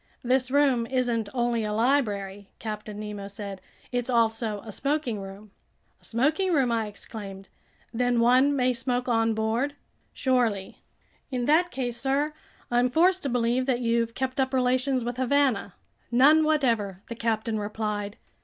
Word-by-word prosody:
"This 255 Hz, +1 st, +2 dB
room 265 Hz, -4 st, +3 dB
isn't 240 Hz, -4 st, 0 dB
only 240 Hz, -2 st, 0 dB
a 210 Hz, 0 st, -2 dB
library," 205 Hz, -5 st, 0 dB
Captain 210 Hz, -1 st, -6 dB
Nemo 210 Hz, -1 st, -6 dB
said, 200 Hz, -1 st, -7 dB, 0.3 s
"it's 245 Hz, 0 st, -1 dB
also 225 Hz, -3 st, +1 dB
a 220 Hz, -, -7 dB
smoking 275 Hz, -2 st, -1 dB
room." 195 Hz, +2 st, -10 dB, 0.5 s
"A -, -, -15 dB
smoking 305 Hz, -, +1 dB
room?" 265 Hz, -6 st, +2 dB
I 225 Hz, -2 st, 0 dB
exclaimed. 200 Hz, -2 st, -9 dB, 0.4 s
"Then 245 Hz, 0 st, +1 dB
one 255 Hz, +4 st, +4 dB
may 255 Hz, -1 st, +2 dB
smoke 250 Hz, 0 st, -2 dB
on 225 Hz, -2 st, +2 dB
board?" 230 Hz, +6 st, -1 dB, 0.4 s
"Surely." 235 Hz, -7 st, 0 dB, 0.5 s
"In 250 Hz, -3 st, -2 dB
that 330 Hz, +5 st, +4 dB
case, 245 Hz, -6 st, -3 dB
sir, 280 Hz, +3 st, 0 dB, 0.4 s
I'm 245 Hz, +1 st, +3 dB
forced 365 Hz, +7 st, +3 dB
to 280 Hz, -, -2 dB
believe 245 Hz, +1 st, +1 dB
that 250 Hz, -2 st, +1 dB
you've 230 Hz, -1 st, 0 dB
kept 260 Hz, 0 st, -2 dB
up 265 Hz, 0 st, +1 dB
relations 255 Hz, 0 st, +1 dB
with 245 Hz, 0 st, -3 dB
Havana." 260 Hz, -6 st, +1 dB, 0.3 s
"None 280 Hz, +6 st, +6 dB
whatever," 230 Hz, -11 st, +1 dB
the -, -, -5 dB
captain 225 Hz, -1 st, -1 dB
replied. 210 Hz, 0 st, -3 dB
240 Hz, 150 wpm, -26 LUFS, 215-260 Hz, 0.5 s, None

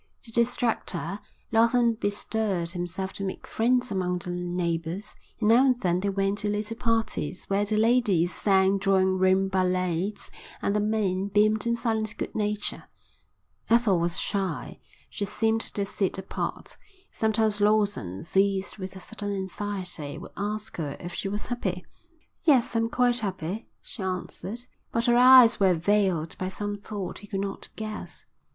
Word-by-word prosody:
To 230 Hz, -, -9 dB
distract 235 Hz, 0 st, +1 dB
her, 200 Hz, -, -4 dB, 0.3 s
Lawson 235 Hz, +1 st, +4 dB
bestirred 205 Hz, -4 st, -1 dB
himself 180 Hz, +2 st, -4 dB
to 200 Hz, -, -5 dB
make 190 Hz, -, -4 dB
friends 250 Hz, +2 st, +1 dB
among 180 Hz, -2 st, 0 dB
the 175 Hz, 0 st, -6 dB
neighbours, 175 Hz, +1 st, -2 dB, 0.2 s
and 215 Hz, -2 st, +2 dB
now 235 Hz, +3 st, +7 dB
and 255 Hz, -3 st, +3 dB
then 180 Hz, -4 st, +1 dB
they 200 Hz, +2 st, -1 dB
went 195 Hz, +1 st, 0 dB
to 210 Hz, -, -1 dB
little 210 Hz, +2 st, -2 dB
parties 230 Hz, -5 st, -1 dB
where 200 Hz, +1 st, +2 dB
the 215 Hz, +1 st, -1 dB
ladies 215 Hz, -7 st, +3 dB
sang 195 Hz, -1 st, +3 dB
drawing 190 Hz, -1 st, +2 dB
room 190 Hz, +1 st, +4 dB
ballads 185 Hz, +1 st, -1 dB, 0.3 s
and 200 Hz, -, 0 dB
the -, -, +3 dB
men 205 Hz, -3 st, 0 dB
beamed 210 Hz, +2 st, +2 dB
in 235 Hz, -, +2 dB
silent 220 Hz, -2 st, -1 dB
good -, -, -4 dB
nature. 210 Hz, -1 st, -1 dB, 0.8 s
Ethel 230 Hz, -6 st, +4 dB
was 170 Hz, 0 st, +1 dB
shy. 195 Hz, -3 st, -2 dB, 0.3 s
She 200 Hz, -, -4 dB
seemed 225 Hz, +2 st, 0 dB
to 200 Hz, -2 st, -2 dB
sit 195 Hz, -1 st, -1 dB
apart. 190 Hz, -, -5 dB, 0.3 s
Sometimes 220 Hz, -1 st, +1 dB
Lawson, 205 Hz, -, +1 dB
seized 195 Hz, +3 st, +1 dB
with 190 Hz, 0 st, -6 dB
a -, -, -8 dB
sudden 205 Hz, 0 st, -5 dB
anxiety, 190 Hz, -5 st, -4 dB
would -, -, -10 dB
ask 210 Hz, +2 st, -4 dB
her 145 Hz, -4 st, -3 dB
if 175 Hz, 0 st, -7 dB
she 195 Hz, -, -3 dB
was 205 Hz, +1 st, -3 dB
happy. 190 Hz, -7 st, -3 dB, 0.6 s
"Yes, 270 Hz, -8 st, +3 dB
I'm 230 Hz, 0 st, +2 dB
quite 245 Hz, 0 st, +2 dB
happy," 195 Hz, -1 st, -4 dB, 0.2 s
she 220 Hz, -, -8 dB
answered. 190 Hz, +4 st, -4 dB, 0.3 s
But 230 Hz, 0 st, 0 dB
her 240 Hz, -, +4 dB
eyes 250 Hz, -2 st, +8 dB
were 190 Hz, -3 st, +4 dB
veiled 180 Hz, -2 st, +1 dB
by 185 Hz, -, -2 dB
some 205 Hz, +2 st, -4 dB
thought 205 Hz, -2 st, -6 dB
he 205 Hz, -, -12 dB
could 195 Hz, -1 st, -2 dB
not 195 Hz, 0 st, -5 dB
guess. 215 Hz, -1 st, -6 dB
200 Hz, 160 wpm, -27 LUFS, 185-220 Hz, 0.8 s, eyes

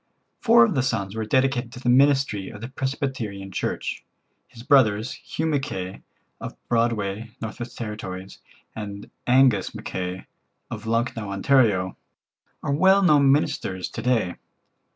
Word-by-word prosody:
Four 235 Hz, 0 st, +6 dB
of 220 Hz, -, -1 dB
the 135 Hz, -, +1 dB
sons 110 Hz, -6 st, -2 dB
were 110 Hz, -1 st, -2 dB
dedicated 130 Hz, -1 st, +1 dB
to -, -, -8 dB
the 125 Hz, -, -6 dB
ministry 135 Hz, -5 st, +3 dB
of 105 Hz, -, -10 dB
the 120 Hz, -, -6 dB
Presbyterian 130 Hz, -8 st, -4 dB
Church. -, -, -3 dB, 0.4 s
His 115 Hz, -, -13 dB
brothers, 115 Hz, -4 st, +3 dB
Hugh 160 Hz, -, -5 dB
Mackay, 135 Hz, -12 st, -2 dB, 0.4 s
of -, -, -7 dB
Broadview, 115 Hz, -2 st, 0 dB
N.W.T., 110 Hz, -5 st, -6 dB, 0.4 s
and 100 Hz, -2 st, -7 dB, 0.2 s
Angus 125 Hz, -6 st, +4 dB
Mackay, 90 Hz, 0 st, -5 dB, 0.5 s
of 110 Hz, -1 st, -6 dB
Lucknow, 115 Hz, -2 st, -1 dB
Ont., 100 Hz, +8 st, -4 dB
are 105 Hz, -9 st, +4 dB, 0.8 s
well 190 Hz, +6 st, +5 dB
known 145 Hz, -6 st, +5 dB
ministers 95 Hz, -10 st, 0 dB
to -, -, -6 dB
day. 115 Hz, -8 st, +1 dB
115 Hz, 130 wpm, -24 LUFS, 100-135 Hz, 0.8 s, Four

